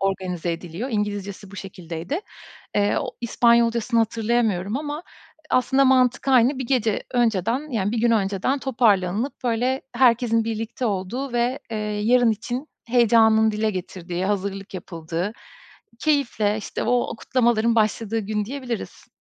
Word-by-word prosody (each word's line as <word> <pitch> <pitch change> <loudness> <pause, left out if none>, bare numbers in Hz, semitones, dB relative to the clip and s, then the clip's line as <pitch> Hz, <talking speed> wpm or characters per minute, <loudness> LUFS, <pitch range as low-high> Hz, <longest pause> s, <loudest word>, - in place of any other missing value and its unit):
organize 185 -3 -1
ediliyor. 175 +8 -5
İngilizcesi 205 -2 -3
bu 200 - -11
şekildeydi. 180 - -5 0.5
Eee, 205 0 +2
o - - -3
İspanyolca'sını 235 0 +3
hatırlayamıyorum 225 -3 0
ama, 295 +1 -4 0.5
e - - -21
aslında 265 +2 +3
mantık 260 0 +3
aynı. 260 +1 +4
1 260 - -3
gece 230 -5 +1
önceden, 240 - +1
yani, 210 -3 -1
1 235 - -1
gün 235 0 +3
önceden 205 +5 +1
toparlanılıp, 225 -2 +1
böyle, 250 +3 0
herkesin 235 -2 +3
birlikte 225 +2 -3
olduğu 215 +7 -3
ve, 245 +2 0
eee, 225 - -3 0.3
yarın 240 +1 +4
için 245 +7 -4 0.2
heyecanın 225 -2 +4
dile 215 +1 0
getirildiği, 180 -1 -5
hazırlık 195 -1 -3
yapıldığı, 170 +2 -4 0.7
keyifle, 235 -9 +1
işte, 205 - -5
o 245 -2 +1
kutlamaların 235 -2 +2
başladığı 220 0 +1
gün 210 0 -2
diyebiliriz. 250 -1 -6
225 Hz, 130 wpm, -23 LUFS, 200-245 Hz, 0.7 s, aynı